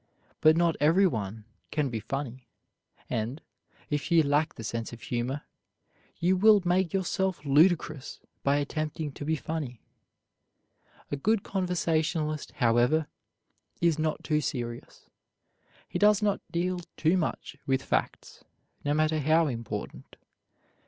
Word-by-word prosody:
But 155 +1 +5
not 170 -1 +3
everyone 125 - +2 0.2
can 150 -3 0
be 115 - -2
funny; 130 +1 -5 0.6
and, 115 +7 -2 0.5
if 145 +2 -1
you 165 -1 +6
lack 150 +2 +1
the 115 - -8
sense 115 +1 -3
of 120 - -9
humor, 125 +5 -3 0.7
you 180 +2 +2
will 210 +2 +6
make 180 -1 +2
yourself 190 -3 -1
ludicrous 155 -1 +2 0.2
by 140 +1 +2
attempting 150 +1 -2
to 140 - -8
be 160 +2 +1
funny. 150 -6 -4 1.3
A - - +1
good 205 +9 +1
conversationalist, 160 -4 -1
however, 120 +6 +3 0.7
is 170 -2 +2
not 155 -1 -1
too 150 -1 +1
serious. 120 -4 -5 0.8
He - - -3
does 210 0 +5
not 205 -1 +1
deal 180 +1 0 0.2
too 165 +3 +3
much 160 -4 -2
with 135 0 +1
facts, - - -2 0.4
no 145 0 +1
matter 155 0 +2
how 160 +3 +4
important. 115 -6 -5
155 Hz, 125 wpm, -28 LUFS, 135-170 Hz, 1.3 s, you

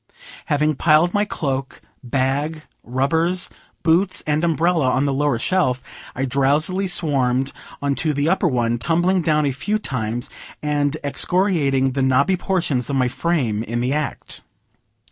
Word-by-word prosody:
Having 150 -1 +1
piled 160 +3 +4
my 205 0 +2
cloak, 135 -8 -3 0.2
bag, 140 +5 -1 0.2
rubbers, 160 +8 0 0.3
books 175 +3 +2
and 150 +1 0
umbrella 165 -3 +2
on 130 +2 +1
the 140 - 0
lower 145 -2 +1
shelf, 130 -2 0 0.3
I 135 - -1
drowsily 145 +9 +1
swarmed 135 -7 +1 0.3
onto 140 +3 +1
the 145 +1 0
upper 190 +1 +2
one, 120 -4 0
tumbling 175 +7 +1
down 150 -2 +2
a 140 - +1
few 205 +11 -1
times, 120 - -3 0.4
and 145 0 0
excoriating 145 -4 +2
the 135 +1 -2
knobby 135 +8 +3
portions 170 -9 -1
of 140 - -1
my 125 -2 +2
frame 130 -8 -1
in 120 +1 -3
the 125 +3 0
act. 150 0 -4
145 Hz, 145 wpm, -21 LUFS, 130-170 Hz, 0.4 s, piled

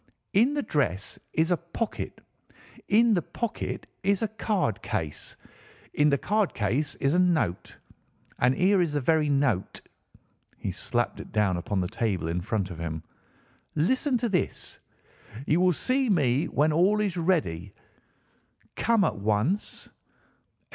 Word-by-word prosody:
"In 240 +9 +4
the 290 - 0
dress 115 - -1
is 160 +2 +1
a 175 - +3
pocket. 170 +7 -5 0.7
In 225 +2 +5
the 180 - +2
pocket 235 +6 -4 0.2
is 200 +2 +1
a - - +2
card 205 - -1
case. 75 -2 -4 0.6
In 150 0 +4
the 140 - +3
card 210 +5 0
case 125 +9 0
is 140 +1 +1
a 180 - +3
note. 155 - +1 0.6
And 125 +1 +3
here 190 +3 +4
is 165 -4 0
the 145 - +1
very 150 +2 +2
note." 135 -9 +1 0.8
He - - -3
slapped - - -2
it - - -9
down 105 -4 +2
upon 95 +2 -1
the 90 - -1
table 95 -6 -1
in 85 +2 -1
front 100 0 -2
of 85 - -8
him. 80 -1 -4 0.7
"Listen 255 - +2
to 240 - -1
this: 190 -5 -2 0.7
'You 160 +4 +2
will 185 0 +5
see 255 - 0
me 145 - +2
when 150 +2 +2
all 190 +6 +3
is 205 -4 0
ready. 125 - 0 1.0
Come 230 -3 +3
at 110 - 0
once. 110 - 0
155 Hz, 150 wpm, -27 LUFS, -, 1.0 s, In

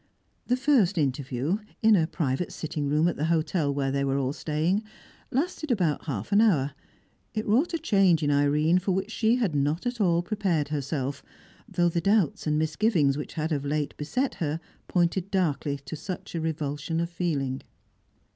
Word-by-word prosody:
The 250 - +2
first 255 -9 +3
interview 140 - 0 0.2
in 220 -1 +7
a 165 -4 +2
private 150 0 -2
sitting 150 -2 -3
room 155 +3 +3
at 175 - -1
the 150 - 0
hotel 160 -2 +1
where 140 -1 -1
they 140 0 0
were 135 0 +1
all 135 0 0
staying 160 +7 0 0.5
lasted 310 +3 -2
about 180 - +1
half 115 -9 -4
an 205 +1 +5
hour; 150 -11 +3 0.6
it 215 - -1
wrought 270 +11 +2
a - - +1
change 195 - +3
in 145 - +2
Irene 150 +4 +3
for 190 +1 -1
which 195 +4 -2
she 225 +1 +2
had 225 -10 0
not 145 - 0
at 245 -2 -2
all 170 -3 +3
prepared 175 -7 0
herself, 140 -1 -2 0.5
though 175 -1 +2
the 170 0 -1
doubts 195 -5 +2
and 150 0 +2
misgivings 155 -2 +2
which 150 - -5
had 160 0 -2
of 145 -3 0
late 145 0 -2
beset 250 - -1
her 155 0 -1 0.3
pointed 175 +1 +1
darkly 155 -7 0
to 150 - -5
such 180 +4 -6
a 165 - -2
revulsion 155 0 -2
of 170 - 0
feeling. 150 -7 -2
160 Hz, 180 wpm, -27 LUFS, 145-195 Hz, 0.6 s, in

